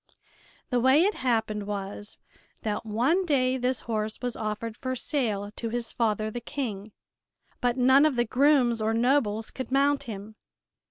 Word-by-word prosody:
The 250 - +2
way 260 +6 +5
it 410 +3 +2
happened 220 - -1
was 205 0 -5 0.5
that 215 +1 -3
one 255 - +2
day 260 -6 +2
this 255 0 -1
horse 215 -2 -3
was 245 -2 -3
offered 215 +1 -4
for 255 +2 -3
sale 220 -7 -2
to 230 - -3
his 235 0 -3
father, 215 -2 0
the 240 - -5
King, 220 -8 -5 0.7
but 245 0 +1
none 260 +4 +6
of 295 - -1
the 240 0 +2
grooms 250 -2 +3
or 220 +1 +1
nobles 230 -3 +1
could 260 -1 -6
mount 280 +1 +3
him. 215 -1 -8
240 Hz, 160 wpm, -27 LUFS, 215-260 Hz, 0.7 s, none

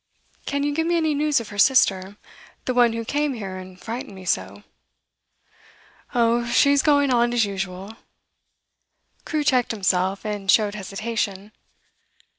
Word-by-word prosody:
Can 280 0 -1
you 290 0 0
give 320 +2 -1
me 345 0 +2
any 315 -2 +1
news 295 -1 +1
of 230 - -8
her 205 -1 -8
sister, 200 -5 +3 0.5
the 255 - -1
one 240 -2 +4
who 230 0 -4
came 290 +2 -1
here 195 -4 -6
and 185 0 -11
frightened 225 -1 -6
me 190 -1 -11
so?' 100 - -2 1.5
'Oh, 235 0 +2
she's 280 +3 +4
going 285 -2 +3
on 240 0 +2
as 235 -2 +3
usual.' 195 +2 -6 1.3
Crewe 305 -2 -1
checked 255 -4 +2
himself, 195 -1 0
and 205 -2 -4
showed 210 0 +4
hesitation. 205 0 -4
225 Hz, 145 wpm, -23 LUFS, 195-265 Hz, 1.5 s, one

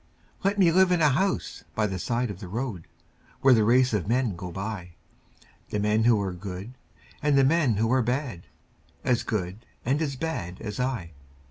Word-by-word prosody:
Let 200 +1 +1
me 180 -4 +5
live 185 +1 +5
in 175 - +3
a 150 -2 +5
house 190 +7 -1
by 110 - +2
the 95 -3 -3
side 120 +3 -1
of 95 - -8
the 100 - -7
road 110 -3 -4 0.5
Where 135 -1 +7
the 110 -3 +4
race 125 +3 +4
of 100 -4 0
men 120 -3 +1
go 90 +1 -7
by 95 -2 -5 0.7
The 105 - -1
men 105 +2 +2
who 115 -3 +5
are 95 -2 -3
good 95 +5 -7 0.5
and 145 -1 +3
the 135 - +6
men 140 -4 +3
who 110 +3 +1
are 130 - +4
bad, 125 - -2 0.6
As 125 -1 +2
good 105 -1 -3 0.2
and 135 +5 +1
as 140 -4 -1
bad 125 - -4
as 105 +2 -6
I. 125 -10 -2
115 Hz, 195 wpm, -26 LUFS, 100-135 Hz, 0.7 s, Where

